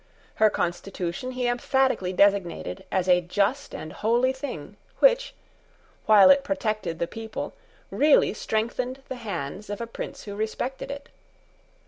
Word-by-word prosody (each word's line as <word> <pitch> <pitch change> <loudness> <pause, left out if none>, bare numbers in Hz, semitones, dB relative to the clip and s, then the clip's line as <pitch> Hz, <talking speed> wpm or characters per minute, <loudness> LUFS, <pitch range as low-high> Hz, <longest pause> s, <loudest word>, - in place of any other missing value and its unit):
Her 215 - +7
constitution 180 +6 -3
he 250 0 -2
emphatically 245 -5 +1
designated 185 - +1
as 185 -1 0
a 180 -1 +5
just 205 +10 -1
and 155 - -7
holy 240 +4 +2
thing, 245 - -7 0.2
which, - - +3 0.7
while 205 -1 +8
it 280 0 +4
protected 215 - -2
the 170 - 0
people, 220 +4 -6 0.4
really 295 0 +4
strengthened 245 +5 -2
the 260 - -4
hands 200 - -5
of 205 - -4
a 235 - -3
prince 230 - -7
who 205 -1 -7
respected 220 +6 -3
it. 280 0 -7
220 Hz, 135 wpm, -26 LUFS, 185-260 Hz, 0.7 s, while